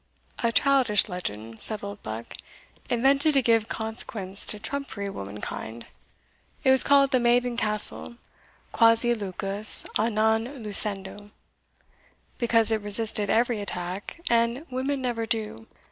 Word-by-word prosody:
"A 235 - 0
childish 255 -5 +2
legend," 115 - -8
said 215 -2 0
Oldbuck, 115 - -9 0.6
"invented 275 +5 +5
to 270 - +4
give 225 -2 +1
consequence 220 -4 0
to 210 - +4
trumpery 220 -4 -6
womankind. 105 - -9 0.8
It 265 - +3
was 265 - +6
called 275 -1 +2
the 255 - +1
Maiden 240 0 0
Castle, 215 +1 +2 0.6
quasi 230 +1 +3
lucus 200 0 +1
a 220 +2 0
non 225 +4 -2
lucendo, 205 -1 +1 1.1
because 230 -2 +1
it 220 -1 -1
resisted 210 0 0
every 230 -1 -1
attack, 185 - -6
and 235 +5 -1
women 265 +1 -4
never 230 -2 -4
do." 210 - -4
220 Hz, 120 wpm, -24 LUFS, 200-240 Hz, 1.1 s, was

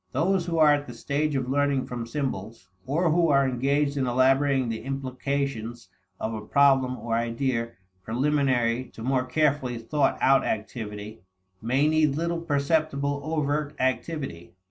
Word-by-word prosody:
Those 175 +5 +1
who 165 -1 -1
are 155 -2 +6
at 145 0 -1
the 120 - -8
stage 145 +4 -1
of 130 -2 -1
learning 140 0 +1
from 120 -2 -5
symbols, 115 -7 -4 0.2
or 160 +5 +1
who 165 0 +3
are 140 -1 +4
engaged 140 +3 0
in 130 -2 0
elaborating 135 +1 +3
the 115 -1 -3
implications 135 -2 -3 0.3
of 110 - -3
a 110 - -4
problem 130 +2 +3
or 115 -1 -4
idea 115 0 -1 0.3
preliminary 130 -1 +1
to 110 - -8
more 130 0 +1
carefully 140 -4 +1
thought 135 +5 0
out 135 0 +4
activity, 105 -2 -5 0.4
may 130 +6 +2
need 155 -2 +2
little 170 +2 -1
perceptible 145 -2 0
overt 150 -1 -1
activity. 130 - -3
135 Hz, 145 wpm, -26 LUFS, 120-145 Hz, 0.4 s, are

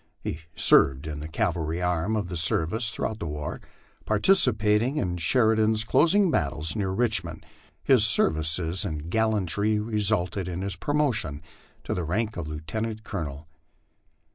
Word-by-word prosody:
He 75 - -5 0.2
served 70 +2 +4
in 75 -2 -5
the 75 - -6
cavalry 80 -3 -2
arm 90 +4 -1
of 105 -4 -2
the 90 - -6
service 85 +7 +1
through - - -4
out 110 -1 -8
the 85 - -5
war, 75 -1 -5 0.4
participating 110 - +3
in 90 -8 -2
Sheridan's 110 +3 +2
closing 175 - +3
battles 80 - -1
near 100 -3 -2
Richmond, 95 -6 -1 0.4
his 130 -6 +4
ser 110 -7 +4
vices 80 +4 0
and 80 -3 -5
gallantry 105 -1 0
resulting 105 -4 0
in 90 +1 -4
his 100 0 -3
promotion 140 - -1 0.4
to - - -3
the 90 - -3
rank 105 +6 -2
of 85 -3 -5
lieutenant 110 +9 -5
colo 100 -7 -4
nel. 70 +2 -9
100 Hz, 150 wpm, -25 LUFS, 80-110 Hz, 0.4 s, served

